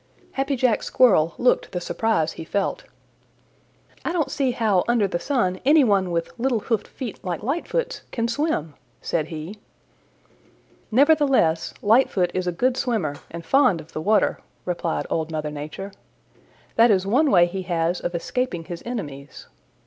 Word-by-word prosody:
Happy 275 Hz, +1 st, -1 dB
Jack 245 Hz, -3 st, +2 dB
Squirrel 175 Hz, -11 st, +3 dB
looked 250 Hz, -, +2 dB
the 180 Hz, -, -1 dB
surprise 175 Hz, -3 st, 0 dB
he -, -, -8 dB
felt. 200 Hz, -, -2 dB, 1.2 s
"I -, -, -1 dB
don't 335 Hz, -5 st, -1 dB
see 275 Hz, -3 st, 0 dB
how 215 Hz, -6 st, +2 dB
under 235 Hz, -4 st, +3 dB
the 175 Hz, -2 st, -2 dB
sun 185 Hz, -7 st, 0 dB
any 290 Hz, +2 st, +6 dB
one 200 Hz, -5 st, +2 dB
with 170 Hz, -1 st, -2 dB
little 245 Hz, -2 st, +1 dB
hoofed 220 Hz, -2 st, -1 dB
feet 245 Hz, -6 st, -7 dB
like 180 Hz, +1 st, -4 dB
Lightfoot's 400 Hz, -, -2 dB
can 230 Hz, -1 st, -1 dB
swim," 235 Hz, -, -1 dB, 0.3 s
said 155 Hz, -2 st, -2 dB
he. 165 Hz, +6 st, -7 dB, 1.3 s
"Nevertheless, 270 Hz, -, +3 dB
Lightfoot 205 Hz, -5 st, +3 dB
is 185 Hz, -1 st, -2 dB
a -, -, +1 dB
good 250 Hz, +8 st, 0 dB
swimmer 200 Hz, -, -1 dB
and 170 Hz, 0 st, -8 dB
fond 255 Hz, -6 st, +4 dB
of 160 Hz, +1 st, -13 dB
the 155 Hz, -, -3 dB
water," 210 Hz, +5 st, +2 dB, 0.3 s
replied 175 Hz, -2 st, -2 dB
Old 160 Hz, -1 st, -1 dB
Mother 155 Hz, -1 st, -3 dB
Nature. 150 Hz, +7 st, -7 dB, 0.9 s
"That 230 Hz, +1 st, +6 dB
is 190 Hz, -3 st, +3 dB
one 270 Hz, +9 st, +3 dB
way 175 Hz, -7 st, +6 dB
he 190 Hz, +2 st, -4 dB
has 175 Hz, -1 st, -1 dB
of 175 Hz, -, -3 dB
escaping 175 Hz, 0 st, -2 dB
his 170 Hz, 0 st, -7 dB
enemies. 145 Hz, -, -7 dB
200 Hz, 155 wpm, -23 LUFS, 170-255 Hz, 1.3 s, any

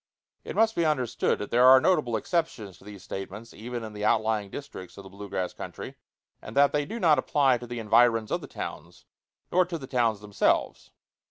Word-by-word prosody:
It -, -, -7 dB
must 225 Hz, 0 st, +3 dB
be 170 Hz, -, +1 dB
understood 145 Hz, -7 st, 0 dB
that 105 Hz, -, -7 dB
there 125 Hz, +2 st, +5 dB
are 130 Hz, 0 st, +9 dB
notable 140 Hz, -7 st, +1 dB
exceptions 110 Hz, -, -3 dB
to -, -, -19 dB
these 100 Hz, -2 st, -11 dB
statements 100 Hz, +4 st, -8 dB
even 120 Hz, +2 st, -6 dB
in 110 Hz, -1 st, -8 dB
the 105 Hz, 0 st, -6 dB
outlying 110 Hz, -1 st, +1 dB
districts 100 Hz, -9 st, -9 dB
of 100 Hz, -, -9 dB
the 95 Hz, -, -13 dB
blue 100 Hz, +1 st, -9 dB
grass 90 Hz, -1 st, -3 dB
country, -, -, -8 dB, 0.5 s
and 110 Hz, -, -9 dB
that 140 Hz, 0 st, +5 dB
they 145 Hz, -1 st, 0 dB
do 225 Hz, +7 st, -6 dB
not 155 Hz, -8 st, +4 dB
apply 135 Hz, -2 st, +2 dB
to 120 Hz, -, -9 dB
the 120 Hz, +1 st, -6 dB
environs 115 Hz, 0 st, +3 dB
of -, -, -1 dB
the -, -, -9 dB
towns, -, -, -8 dB, 0.5 s
nor 185 Hz, +1 st, +4 dB
to 175 Hz, -1 st, -5 dB
the 135 Hz, -, -8 dB
towns 120 Hz, -5 st, 0 dB
themselves. 105 Hz, -1 st, 0 dB
120 Hz, 205 wpm, -27 LUFS, 105-145 Hz, 0.5 s, are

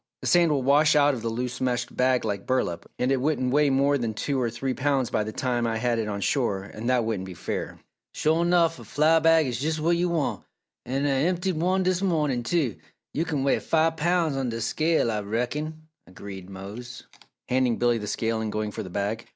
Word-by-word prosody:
The -, -, -4 dB
sand 170 Hz, -2 st, +4 dB
will 140 Hz, -3 st, +1 dB
wash 150 Hz, +4 st, +4 dB
out 145 Hz, -1 st, +5 dB
of 120 Hz, -3 st, -5 dB
a 115 Hz, -, -1 dB
loose 125 Hz, +2 st, -4 dB
meshed 125 Hz, -2 st, -1 dB
bag 125 Hz, -1 st, +2 dB
like 100 Hz, -2 st, -3 dB
burlap, 90 Hz, -10 st, -1 dB
and 125 Hz, +2 st, 0 dB
it 135 Hz, -2 st, +1 dB
wouldn't 130 Hz, -3 st, 0 dB
weigh 150 Hz, 0 st, +4 dB
more 140 Hz, +1 st, +2 dB
than 115 Hz, -3 st, -2 dB
two 135 Hz, +4 st, -1 dB
or 120 Hz, -, +1 dB
three 130 Hz, +3 st, -3 dB
pounds 135 Hz, -2 st, 0 dB
by 105 Hz, -, +1 dB
the 110 Hz, -, -5 dB
time 120 Hz, 0 st, -1 dB
I 115 Hz, -1 st, -1 dB
had 120 Hz, 0 st, 0 dB
it 110 Hz, -, -2 dB
on 100 Hz, -1 st, -3 dB
shore, 100 Hz, -6 st, 0 dB
and 110 Hz, +4 st, -5 dB
that 125 Hz, -3 st, +2 dB
wouldn't 100 Hz, -4 st, -2 dB
be 90 Hz, -, -8 dB
fair." -, -, -4 dB, 0.4 s
"Sho, 160 Hz, +2 st, +2 dB
nuff! 170 Hz, -1 st, +2 dB
A -, -, -10 dB
flour 160 Hz, +2 st, +3 dB
bag 165 Hz, -1 st, +5 dB
is 125 Hz, -2 st, -3 dB
jus 155 Hz, +3 st, -1 dB
what 170 Hz, +3 st, +2 dB
yo' 175 Hz, +1 st, +1 dB
want 140 Hz, -, -1 dB, 0.4 s
an' 135 Hz, +3 st, -1 dB
Ah -, -, +2 dB
emptied 175 Hz, +6 st, 0 dB
one 185 Hz, +3 st, +1 dB
dis 185 Hz, 0 st, +1 dB
mawnin', 150 Hz, -9 st, +1 dB
too. 135 Hz, -, 0 dB, 0.4 s
Yo' 160 Hz, -, 0 dB
kin 150 Hz, -5 st, -1 dB
weigh 140 Hz, -, +2 dB
five 160 Hz, 0 st, +1 dB
poun's 165 Hz, -2 st, +1 dB
on 135 Hz, -2 st, -1 dB
dis 115 Hz, -1 st, -3 dB
scale, 160 Hz, -7 st, +1 dB
Ah 105 Hz, -, -1 dB
reckon," 145 Hz, +9 st, -3 dB, 0.2 s
agreed 95 Hz, 0 st, -9 dB
Mose, 100 Hz, +6 st, -8 dB, 0.4 s
handing 125 Hz, -2 st, +1 dB
Billy 120 Hz, -1 st, +2 dB
the 105 Hz, -, -6 dB
scale 115 Hz, +1 st, -1 dB
and 110 Hz, -1 st, -3 dB
going 105 Hz, 0 st, -2 dB
for -, -, -5 dB
the 95 Hz, -, -7 dB
bag. 100 Hz, +5 st, -3 dB
130 Hz, 225 wpm, -26 LUFS, 115-155 Hz, 0.4 s, out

